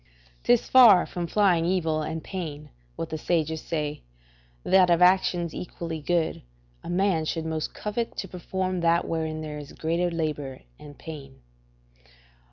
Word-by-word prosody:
'Tis 240 -1 +3
far 230 -8 +7
from 175 -1 -4
flying 185 -3 +3
evil 165 -3 0
and 160 +1 -4
pain, 150 -6 -6 0.2
what 165 - -5
the 160 - -4
sages 160 -1 0
say, 150 -2 -3 0.6
that 185 -1 +4
of 170 -1 +4
actions 180 -2 +3
equally 165 -2 -6
good, 170 +1 0 0.4
a - - -8
man 180 -2 +1
should 160 +1 -3
most 160 -1 -3
covet 220 +2 -3
to 190 - -4
perform 185 +1 -3
that 170 0 +2
wherein 160 -1 -2
there 150 -1 -6
is 145 -1 -10
greater 170 +2 0
labour 150 -5 -3 0.2
and 145 -1 -12
pain. 140 - -10
165 Hz, 150 wpm, -26 LUFS, 155-180 Hz, 0.6 s, far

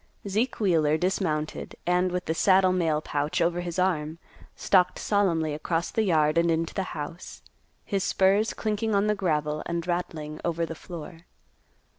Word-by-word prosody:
Zeke 215 +6 -1
Wheeler 160 -7 +3
dismounted, 165 -4 -2
and, 180 +1 +2
with 180 0 -2
the 160 - 0
saddle 185 +1 +4
mail 160 -4 +1
pouch 145 0 -2
over 175 +1 +1
his 175 -1 -5
arm, 165 -4 0 0.4
stalked 180 -2 +3
solemnly 170 -7 +1
across 165 +3 -2
the 225 - +1
yard 160 -5 +3
and 170 0 +2
into 165 0 0
the 195 - -1 0.2
house, 155 +4 -7 0.4
his 195 -2 -1
spurs 200 +3 +2
clinking 215 0 -1
on 200 +1 +3
the 210 - +2
gravel 150 -6 -1
and 170 -1 -2
rattling 165 -4 -3
over 170 -1 0
the 165 - -6
floor. 165 0 -10
175 Hz, 160 wpm, -26 LUFS, 160-190 Hz, 0.4 s, saddle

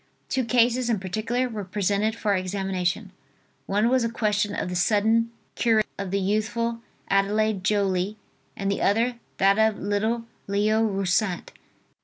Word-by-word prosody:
Two 260 - 0
cases 240 +1 +2
in 225 -4 +1
particular 220 +7 -1
were 215 -4 -5
presented 205 +3 0
for 215 -3 0
examination. 190 +1 -2 0.6
One 210 +3 +2
was 255 0 +3
a 230 - 0
question 210 -2 0
of - - -2
the 180 - -4
sudden 220 +5 +2 0.2
cure 225 -2 +3 0.2
of 200 -1 -3
the 200 +2 0
youthful 225 +4 -1 0.3
Adelaide 200 0 +1
Joly, 200 0 +1 0.4
and 200 0 -1
the 200 - -2
other, 235 +4 +2 0.2
that 195 +2 +4
of 220 -1 +3
little 220 +4 -1 0.2
Leo 210 +2 +2
Roussat. 195 -2 0
210 Hz, 145 wpm, -25 LUFS, 195-230 Hz, 0.6 s, that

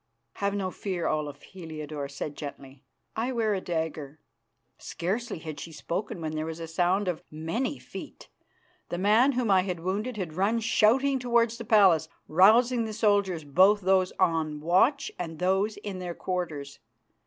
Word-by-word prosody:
"Have 200 0 -1
no 190 -2 -2
fear, 185 -4 -4
Olaf," 150 -2 -2
Heliodore 155 -5 -7
said 140 +1 -6
gently, 140 -2 -9 0.3
"I 235 +4 -1
wear 225 -4 +1
a 190 - -2
dagger." 160 -4 -4 0.6
Scarcely 205 +6 -3
had 155 -2 -7
she 165 - -8
spoken 180 +6 -4
when 155 -1 -3
there 155 0 -3
was 160 0 -6
a 165 - -4
sound 180 +4 +1
of 175 -3 -2
many 165 - -3
feet. - - -10 0.6
The 175 - -3
man 220 +9 +4
whom 245 -4 0
I 190 -1 +5
had 180 -3 -4
wounded 210 +7 -2
had 180 -6 -4
run 200 +7 +1
shouting 260 +5 +3
towards 235 -1 +1
the 230 - -6
palace, 190 -8 +5 0.2
rousing 230 +8 +5
the 220 - -5
soldiers, 200 -6 +1
both 190 +8 +4
those 185 0 +3
on 160 -4 +1
watch 190 - +2
and 165 -2 -5
those 190 +4 +1
in 205 -2 -6
their 175 -2 -5
quarters. 160 -7 -4
185 Hz, 165 wpm, -27 LUFS, 160-215 Hz, 0.6 s, I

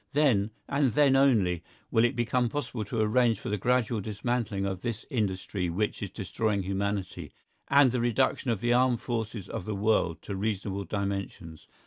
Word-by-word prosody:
Then, 130 -9 +3 0.2
and 140 -4 +1
then 140 0 +4
only, 110 -11 +3 0.3
will 115 - +4
it 120 +3 +2
become 120 +1 +1
possible 125 -4 -3
to 110 +2 -2
arrange 115 0 +3
for - - -5
the 105 - 0
gradual 120 0 +1
dismantling 105 -1 -2
of 95 -2 -3
this 115 -1 -4
industry 95 -5 -1
which 100 +5 -2
is 100 - -3
destroying 100 +1 -2
humanity, 100 0 -3 0.4
and 140 -2 +5
the 125 -1 0
reduction 120 +2 +1
of 110 -4 0
the 120 0 +2
armed 125 -1 +3
forces 115 -4 -3
of 90 - -5
the 110 - -3
world 100 -5 +1
to 100 - -5
reasonable 100 -1 -2
dimensions. 100 -5 -4
110 Hz, 170 wpm, -28 LUFS, 100-120 Hz, 0.4 s, and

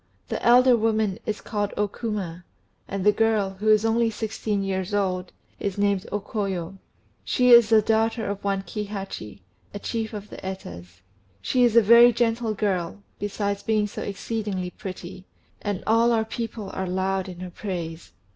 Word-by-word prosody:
The - - -3
elder 250 +1 +6
woman 220 -3 +1
is 215 -1 -2
called 205 -2 -3
O 210 - +2
Kuma, 200 -5 -5 0.4
and 195 0 -3
the 210 - +7
girl, 215 -3 +1
who 215 +1 +1
is 215 0 +5
only 230 +1 +2
sixteen 215 -2 -2
years 190 +1 -2
old, 185 -3 -1 0.3
is 200 -1 -3
named 200 -2 +1
O 205 - 0
Koyo. 195 -3 -4 0.4
She 250 -1 +3
is 235 -2 +8
the 220 -2 +5
daughter 225 +1 +1
of 200 0 -4
one 195 -1 0
Kihachi, 195 - -6 0.3
a - - -1
chief 225 +2 -3
of 210 0 -7
the - - -8
Etas. 90 - -8 0.4
She 250 - +1
is 235 -2 +3
a 235 - +7
very 235 +3 +8
gentle 230 -1 0
girl, 195 -2 -2 0.2
besides 200 0 -2
being 215 0 +1
so 205 - -6
exceedingly 200 -3 -3
pretty; 185 0 -8 0.3
and 205 -3 -3
all 230 +2 +4
our 225 -1 +2
people 225 -3 -5
are 190 0 -3
loud 190 +1 -1
in 180 -1 -9
her 180 -1 -6
praise." 170 -4 -6
205 Hz, 170 wpm, -25 LUFS, 190-225 Hz, 0.4 s, is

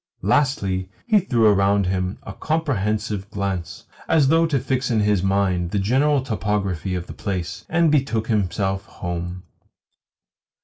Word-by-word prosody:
Lastly, 100 -6 +1 0.2
he 215 -4 +4
threw 120 - +1
around 100 -1 +4
him 90 0 -1
a 95 - -7
comprehensive 110 -10 -1
glance 100 -4 -4 0.2
(as 150 -4 +4
though 165 +1 +4
to 145 -4 +1
fix 130 0 -1
in 110 -3 +2
his 105 -2 +2
mind 95 -2 +1
the 100 - -2
general 130 +7 +2
topography 100 -5 -2
of 90 -1 -4
the - - -9
place) 100 +1 -4
and 165 -1 +3
betook 130 -7 +1
himself 95 -2 0
home. 90 -1 -5
100 Hz, 140 wpm, -22 LUFS, 95-130 Hz, 0.2 s, he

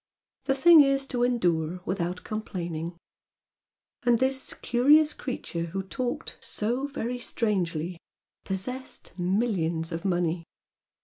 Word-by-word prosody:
The 270 -1 +2
thing 325 +3 +8
is 275 -1 +3
to 245 -2 0
endure 180 -8 +1
without 180 -1 -2
complaining!" 175 -6 -4 1.0
"And 240 -1 +4
this 265 +2 0
curious 295 +5 +4
creature 170 -10 -4
who 190 +3 -4
talked 245 +6 -4
"so 245 +6 -1
very 250 -3 -3
strangely," 180 -8 -1 0.4
possessed 250 +8 -4
millions 175 -4 0
of 165 0 -4
money! 175 -3 0
205 Hz, 110 wpm, -27 LUFS, 175-250 Hz, 1.0 s, thing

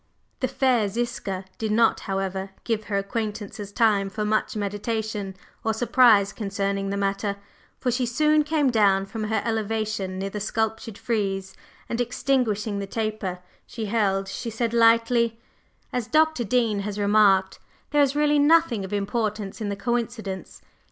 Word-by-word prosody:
The 255 - +1
fair 250 -5 +2
Ziska 195 -3 -3
did 220 -1 -1
not, 225 +1 +3
however, 195 0 -3
give 220 -2 -1
her 200 -1 -1
acquaintances 205 -1 -4
time 205 -3 +2
for 210 +2 -3
much 215 +1 0
meditation 205 -1 -3 0.3
or 220 -1 0
surprise 220 -4 +4
concerning 195 -1 -2
the 200 - -2
matter, 200 +1 -1 0.4
for 250 - -1
she 250 0 0
soon 300 +5 +3
came 295 -3 +1
down 200 -4 +3
from 215 +2 -5
her 220 -1 0
elevation 215 -4 -2
near 195 +1 -3
the 210 - -4
sculptured 220 0 -2
frieze 195 -5 -2 0.3
and, 235 +1 -1
extinguishing 230 -5 0
the 200 - -4
taper 215 -4 -3 0.3
she 225 -3 -5
held, 200 -3 +1
she 230 - -5
said 230 +1 -2
lightly: 230 0 +3 0.5
"As 245 -3 -2
Dr. 310 0 +3
Dean 230 -2 +1
has 200 0 -4
remarked, 200 -2 +3 0.3
there 295 0 +4
is 280 0 +2
really 295 0 +3
nothing 290 -8 +4
of 190 - -7
importance 205 0 -2
in 210 - -2
the 200 - -2
coincidence. 220 -2 -3
215 Hz, 150 wpm, -25 LUFS, 200-235 Hz, 0.5 s, surprise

